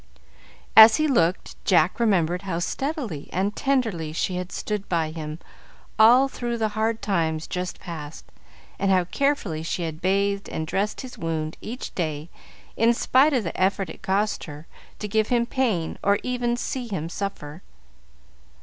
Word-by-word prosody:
As 220 0 +10
he 310 - +2
looked, 180 - 0
Jack 185 +1 +3
remembered 180 -6 +2
how 190 -4 -3
steadily 240 - -3
and 195 +4 -1
tenderly 225 - 0
she 180 +2 -1
had 180 0 -5
stood 210 -2 -4
by 165 -3 0
him 155 -1 -6 0.6
all 245 +5 +7
through 240 -3 -4
the 220 -1 0
hard 220 +1 -1
times 160 -6 0
just 180 0 -4
past, 155 -3 -8 0.5
and 195 - +1
how 185 -2 +4
carefully 205 - -1
she 170 +2 -3
had 160 0 -5
bathed 200 +1 0
and 160 - -3
dressed 200 +6 -2
his 255 -2 -10
wound 160 -1 -3
each 245 +3 -6
day 155 -2 -3 0.5
in 230 +1 +3
spite 270 +5 +4
of 250 -4 +1
the 170 - -4
effort 190 -1 0
it - - -13
cost 200 +2 0
her 150 0 -10 0.3
to 210 - -5
give 215 +1 +1
him 240 -1 +2
pain 230 -10 -1
or 200 0 +3
even 245 -1 -1
see 250 0 -3
him 165 -7 -3
suffer. 170 -4 -6
195 Hz, 160 wpm, -24 LUFS, 165-230 Hz, 0.6 s, As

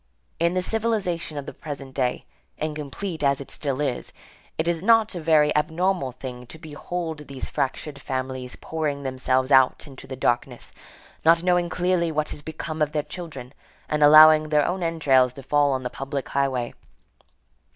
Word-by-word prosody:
In 170 +2 +1
the 185 - +1
civilization 200 -8 -1
of 140 - -5
the - - -7
present 140 -3 -8
day, 125 -2 -1 0.3
incomplete 155 +3 -4
as 140 -1 +2
it 140 - -8
still 140 -3 -2
is, 135 -4 -2 0.4
it 160 - -1
is 170 -1 0
not 225 +1 +4
a 175 - -4
very 155 -2 +3
abnormal 160 -1 0
thing 125 -1 -8
to 160 - -11
behold 160 0 -6
these 135 -1 -6
fractured 140 +1 -3
families 130 -1 -4
pouring 150 -3 -3
themselves 130 0 0
out 130 +2 +4
into 135 -2 -12
the 130 - -6
darkness, 120 0 -2 0.5
not 165 +1 +5
knowing 175 -1 +2
clearly 180 -2 0
what 155 -1 -1
has - - -7
become 160 +1 -6
of 150 0 +1
their 150 -1 0
children, 150 -5 -9 0.3
and 150 0 -1
allowing 155 +1 +8
their 150 -1 +3
own 180 +1 -2
entrails 140 -7 +3
to 135 - -10
fall 145 +1 +2
on 130 -1 -1
the 125 - -2
public 135 +1 -5
highway. 130 -3 -1
150 Hz, 170 wpm, -24 LUFS, 135-165 Hz, 0.5 s, allowing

